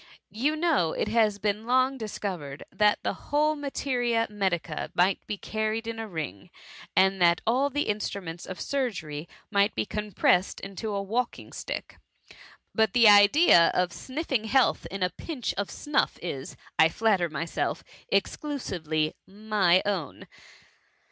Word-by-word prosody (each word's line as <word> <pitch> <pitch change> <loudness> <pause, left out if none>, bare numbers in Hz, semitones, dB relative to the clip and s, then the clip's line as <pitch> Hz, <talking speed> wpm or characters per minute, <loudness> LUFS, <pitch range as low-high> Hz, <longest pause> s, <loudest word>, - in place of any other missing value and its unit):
You 280 +8 0
know 310 - +1
it - - -2
has 215 -2 +2
been 210 +2 -2
long 255 +2 +3
discovered, 185 -10 -5
that 210 -1 +3
the - - 0 0.2
whole 305 +1 +2
materia 250 -5 -1
medica 180 -6 -2
might 185 +2 +3
be 205 - -3
carried 220 +2 -2
in 230 0 -5
a 225 - -4
ring, 155 - -6 0.5
and 190 0 +3
that 170 -1 +5
all 260 +5 +2
the 290 +2 0
instruments 195 -5 -4
of 185 - -7
sur 275 -3 0
gery 155 -5 -7 0.2
might 200 0 +2
be 110 - -1
compressed 205 - +1
into 195 +3 -5
a 200 -1 -2
walking 235 +5 -3
stick. - - -6 0.7
But 220 -3 +2
the 235 -2 +6
idea 205 - +7
of 180 -1 +1
sniffing 265 -4 -3
health 260 +3 +2
in 195 -1 -3
a 180 - +1
pinch 255 - -4
of 200 - -3
snuff 295 -1 -1
is, 140 -6 -6 0.2
I 160 - +7
flatter 190 -2 +1
myself, 160 +3 -3 0.3
exclusively 160 - -1
my 195 -3 +2
own." 185 -9 -3
210 Hz, 145 wpm, -27 LUFS, 180-240 Hz, 0.7 s, idea